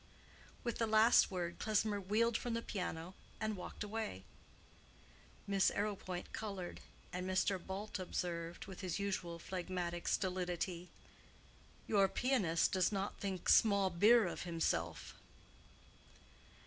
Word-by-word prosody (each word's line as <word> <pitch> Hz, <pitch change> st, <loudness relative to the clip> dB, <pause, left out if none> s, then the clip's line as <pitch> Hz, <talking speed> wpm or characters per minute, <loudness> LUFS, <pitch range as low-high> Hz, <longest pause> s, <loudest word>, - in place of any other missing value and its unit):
With 235 Hz, -2 st, -2 dB
the 230 Hz, -, +2 dB
last 220 Hz, +2 st, +6 dB
word 175 Hz, -2 st, -3 dB
Klesmer 215 Hz, -1 st, +1 dB
wheeled 220 Hz, +4 st, +2 dB
from 235 Hz, 0 st, -1 dB
the 230 Hz, -, -2 dB
piano 180 Hz, -2 st, -4 dB, 0.3 s
and 215 Hz, -1 st, -1 dB
walked 185 Hz, -, -6 dB
away. 210 Hz, -, -4 dB, 1.2 s
Miss 200 Hz, -1 st, +3 dB
Arrowpoint 195 Hz, -3 st, -3 dB
colored, 195 Hz, -5 st, -5 dB, 0.3 s
and 180 Hz, +1 st, -3 dB
Mr. 185 Hz, -1 st, +1 dB
Bult 195 Hz, +2 st, -5 dB
observed, 170 Hz, -2 st, -3 dB
with 190 Hz, -1 st, -9 dB
his 180 Hz, -3 st, -2 dB
usual 190 Hz, -4 st, -2 dB
phlegmatic 175 Hz, -1 st, -4 dB
stolidity, 180 Hz, -1 st, -1 dB, 1.0 s
"Your 200 Hz, -2 st, +4 dB
pianist 200 Hz, -12 st, +2 dB
does 185 Hz, 0 st, +2 dB
not 195 Hz, 0 st, -2 dB
think 190 Hz, -3 st, -3 dB
small 200 Hz, -4 st, +5 dB
beer 215 Hz, +6 st, +6 dB
of 175 Hz, -, -4 dB
himself." 125 Hz, -, -1 dB
190 Hz, 120 wpm, -37 LUFS, 175-210 Hz, 1.2 s, last